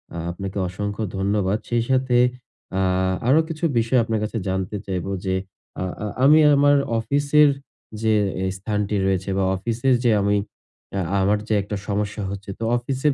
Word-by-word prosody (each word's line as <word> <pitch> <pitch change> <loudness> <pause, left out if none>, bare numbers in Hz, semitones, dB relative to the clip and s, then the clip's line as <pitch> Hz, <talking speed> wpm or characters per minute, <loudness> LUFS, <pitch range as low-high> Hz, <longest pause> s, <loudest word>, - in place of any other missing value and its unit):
আ - - -4
আপনাকে 95 +2 -6
অসংখ্য 100 +3 -4
ধন্যবাদ। 100 0 +1
সেই 120 -1 +1
সাথে 130 -1 +2 0.6
আ - - +2 0.5
আরও 150 +5 +5
কিছু 165 +1 -7 0.2
বিষয় 115 +2 +2
আপনার 110 -1 -1
কাছে 110 +2 -3
জানতে 95 +2 -2
চাইবো। 95 0 -3
যে 95 0 0 0.5
আ - - 0 0.2
আ - - -2 0.2
আমি 150 +3 +7 0.2
আমার 145 +1 +5 0.2
অফিসের 145 +4 +3 0.5
যে 110 -1 +2 0.4
স্থানটি 105 +2 -2
রয়েছে 95 0 0
বা 95 - +2
অফিসে 115 +6 -1
যে 120 - +4
আমি 100 +1 +2 0.6
অ্যা 100 - -1 0.2
আমার 100 +2 +3
যে - - 0
একটা 100 +2 -5
সমস্যা 105 0 -2
হচ্ছে। 100 0 -7
তো - - -4
অফিসের 135 +4 0
105 Hz, 160 wpm, -22 LUFS, 100-125 Hz, 0.6 s, আমি